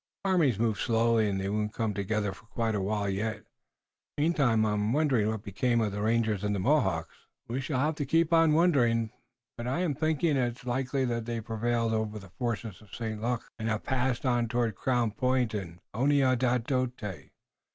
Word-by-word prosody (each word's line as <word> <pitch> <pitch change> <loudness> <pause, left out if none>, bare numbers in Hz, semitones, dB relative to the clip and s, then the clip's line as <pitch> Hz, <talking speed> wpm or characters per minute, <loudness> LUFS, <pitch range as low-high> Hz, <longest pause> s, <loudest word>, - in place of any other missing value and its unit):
"Armies 165 - +3
move 110 -2 0
slowly 115 -1 +2
and 95 -1 -1
they 95 - -2
won't 105 +1 -2
come 110 -2 -1
together 100 0 -1
for 105 - -17
quite 115 -1 -1
a 100 - 0
while 100 +1 -1
yet. 105 +3 -2 0.7
Meantime, 140 -8 +3
I'm 105 +1 0
wondering 135 -8 +2
what 110 -1 -2
became 115 +4 0
of 110 -3 0
the 105 +1 -4
rangers 110 -2 +1
and 105 0 0
the - - -1
Mohawks." 95 - 0 0.2
"We 125 +4 -2
shall 135 -1 -2
have 150 +4 +2
to 145 - -1
keep 165 0 +2
on 165 -2 +5
wondering, 120 -10 +3 0.5
but 120 +1 -5
I 135 +8 0
am 170 -5 +1
thinking 155 0 +1
it 125 0 -2
likely 130 +2 0
that 115 -2 -2
they 115 0 -3
prevailed 115 +1 -1
over 110 -1 -1
the 100 -3 -11
forces 115 -4 -4
of 105 -3 -12
St. 110 -2 -4
Luc 120 +1 -1 0.2
and 110 0 -2
have 110 -1 -1
passed 130 -1 -1
on 120 -2 +2
toward 115 -1 0
Crown 120 +2 0
Point 125 0 +1
and 90 -5 -5 0.2
Oneadatote. 125 - +1
115 Hz, 185 wpm, -29 LUFS, 105-130 Hz, 0.7 s, on